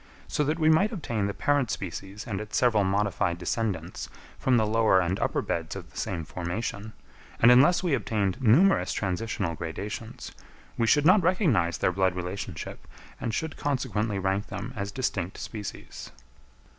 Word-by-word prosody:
So 150 - 0
that 155 +3 0
we 155 -2 +2
might 175 +7 +4
obtain 115 - -2
the 100 - -3
parent 145 -4 +1
species 95 +2 -5
and 100 -4 -3
its 105 0 -3
several 115 -5 +3
modified 95 -3 0
descendants 90 -2 -3 0.3
from 130 -2 +3
the 110 - +3
lower 110 -3 +4
and 90 +1 0
upper - - 0
beds 80 -1 -3
of - - -9
the - - -23
same 85 -4 -3
formation, 100 +5 -4 0.5
and 115 - +7
unless 145 +10 +6
we 175 -5 +1
obtained 110 -3 -1
numerous 150 - +4
transitional 100 -2 -2
gradations, 100 +8 -6 0.4
we 115 - +1
should 145 +4 +4
not 185 +4 +7
recognise 160 - +2
their - - +1
blood 95 0 +1
relationship, 90 -1 -6 0.3
and 115 - -2
should 160 -1 -3
consequently 115 -7 -1
rank 95 +1 -1
them 120 +5 -6
as 100 -1 -4
distinct 100 -8 -2
species. 105 -3 -7
105 Hz, 160 wpm, -27 LUFS, 95-130 Hz, 0.5 s, and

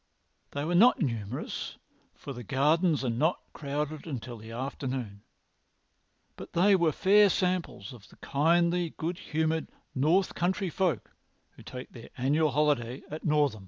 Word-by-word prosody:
They 145 +1 -2
were 170 - -1
not 225 +8 +6
numerous, 115 - -3 0.4
for 140 - -8
the 125 - -8
gardens 150 - +2
are - - +1
not 155 +10 +1
crowded 150 +2 -4
until 125 -4 -5
the 110 +1 -11
afternoon, 125 -3 -4 1.1
but - - -10
they 195 +4 +5
were 170 -4 +3
fair 205 +5 +5
samples 180 - -1
of 110 -4 -14
the - - -18
kindly, 170 +3 +1
good 170 +3 -3
humoured 160 0 -1 0.3
north 165 +8 +2
country 185 +1 -1
folk 170 - -1 0.4
who - - -16
take 125 0 -9
their 115 - -11
annual 150 +5 +2
holiday 140 -3 0
at 155 - -6
Northam. 150 -7 +2
150 Hz, 145 wpm, -29 LUFS, 130-170 Hz, 1.1 s, not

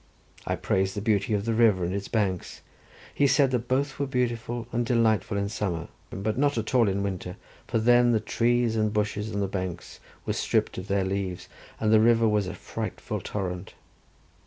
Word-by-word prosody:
I - - +1
praised 95 0 0
the - - -1
beauty 105 0 +1
of 100 0 -2
the 115 - 0
river 110 -5 +4
and 90 - -2
its 100 0 -3
banks: 95 -5 -2 0.5
he 140 - +3
said 135 0 +4
that 125 -1 -1
both 135 +2 0
were 140 - 0
beautiful 120 -2 -2
and 120 0 0
delightful 110 -4 +2
in 100 0 0
summer, 95 -5 -3 0.2
but 105 +5 -2
not 145 -2 +2
at 110 +2 -3
all 120 -5 +4
in 100 +1 -1
winter, 95 -1 -4 0.3
for - - 0
then 120 +2 +5
the 110 - +3
trees 115 +1 +1
and 110 -1 +1
bushes 105 0 -1
on 100 - -2
the 100 - 0
banks 90 -2 -5 0.3
were - - 0
stripped - - 0
of 95 - -8
their 100 -2 +1
leaves, 95 -2 -3 0.3
and 110 0 +2
the 110 - +7
river 115 0 +4
was 105 -3 +1
a 90 - -5
frightful - - -5
torrent. 90 -3 -4
110 Hz, 195 wpm, -27 LUFS, 100-120 Hz, 0.5 s, the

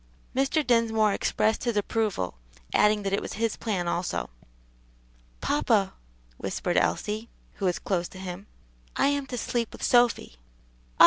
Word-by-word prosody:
Mr. 275 +3 +2
Dinsmore 225 -3 +3
expressed 220 +2 +1
his 235 -3 0
approval, 205 - -1 0.3
adding 210 0 +4
that 195 0 -1
it 200 - +2
was - - -5
his 225 +1 0
plan 195 -6 -2
also. 170 - -1 1.1
"Papa," - - +2 0.4
whispered - - -2
Elsie, 215 +2 0 0.3
who 200 - -2
was 180 -1 +2
close 175 -3 -1
to - - -13
him, 185 +2 -7 0.5
"I 275 - +3
am 285 -1 -1
to 250 - -4
sleep 235 -1 -1
with - - -9
Sophy." 240 - +3 0.6
"Ah! - - -31
215 Hz, 145 wpm, -27 LUFS, 190-235 Hz, 1.1 s, adding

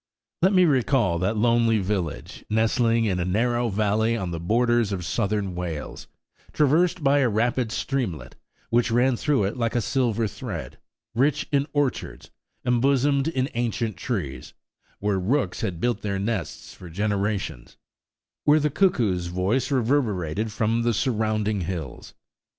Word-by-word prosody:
Let 185 +3 +5
me 185 -1 +6
recall 130 - +2
that 100 +5 0
lonely 115 0 +3
village, 95 -5 -3
nestling 115 +1 +2
in 95 -4 0
a - - 0
narrow 120 +6 +1
valley 110 +3 +1
on 95 -5 -3
the 85 - -4
borders 120 +4 +2
of 90 -3 -3
Southern 100 -1 -1
Wales, 85 -4 -5 0.5
traversed 165 +4 +2
by 140 +1 +4
a 130 -3 +3
rapid 115 +2 0
streamlet, 120 - -3 0.4
which 120 +1 +3
ran 120 +2 +3
through 140 -2 +1
it 100 +6 -2
like 115 -1 -1
a - - +3
silver 115 -2 0
thread; 100 -4 -7 0.3
rich 140 +5 +1
in 140 0 +2
orchards, 145 -3 -2 0.3
embosomed 135 +3 +2
in 130 -5 0
ancient 115 -2 -1
trees, 80 - -4 0.4
where 100 -1 0
rooks 130 +11 0
had 95 -7 -3
built 120 +4 0
their 100 -2 -2
nests 95 -5 -4
for 90 - -11
generations; 100 - -2 0.7
where 150 +1 +5
the 150 0 0
cuckoo's 110 - +1
voice 95 +11 0
reverberated 110 - 0
from 115 +2 +1
surrounding 110 -3 0
hills. 85 -1 -6
115 Hz, 140 wpm, -24 LUFS, 100-125 Hz, 0.7 s, me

